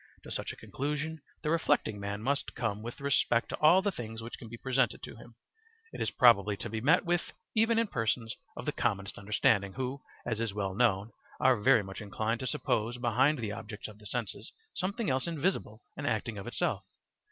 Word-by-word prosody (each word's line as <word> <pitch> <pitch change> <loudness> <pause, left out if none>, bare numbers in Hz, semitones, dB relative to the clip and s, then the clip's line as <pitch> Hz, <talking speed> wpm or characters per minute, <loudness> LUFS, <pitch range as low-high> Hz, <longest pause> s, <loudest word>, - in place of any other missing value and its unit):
To - - -10
such - - -3
a - - -9
conclusion 150 +3 -3 0.2
the 150 - +1
reflecting 145 -10 +2
man 100 +1 -4
must 140 +3 -1
come 105 -3 -1
with 120 +2 -7
respect 140 -4 +2
to - - -3
all 170 +5 +6
the 205 - +2
things 115 - -6
which 115 +1 -7
can 115 - -9
be 115 - -7
presented 130 -2 +1
to - - -7
him: 115 +1 -14 0.6
it - - -6
is - - +1
probably 105 -4 +5
to 115 - -5
be 110 -1 -2
met 160 - +4
with 175 0 0 0.2
even 225 +1 +3
in 230 - +4
persons 115 - -1 0.2
of - - -5
the - - +1
commonest 100 0 -1
understanding, 100 -1 +2
who, 130 +1 -3 0.2
as 115 -2 -1
is 110 -3 -2
well 100 -2 -1
known, 105 -1 +2 0.3
are 130 -1 +5
very 125 -2 +5
much 95 -1 -7
inclined 110 +3 -1
to 130 - -3
suppose 120 -5 0
behind 125 +5 +3
the 110 -4 -3
objects 105 +1 -6
of 105 -1 -12
the 105 - -9
senses 115 -2 -4 0.2
something 200 +5 -2
else 130 +5 +1
invisible 160 - -1
and 145 0 -4
acting 110 -2 -1
of 100 - -7
itself. 120 - -1
120 Hz, 205 wpm, -31 LUFS, 105-140 Hz, 0.6 s, all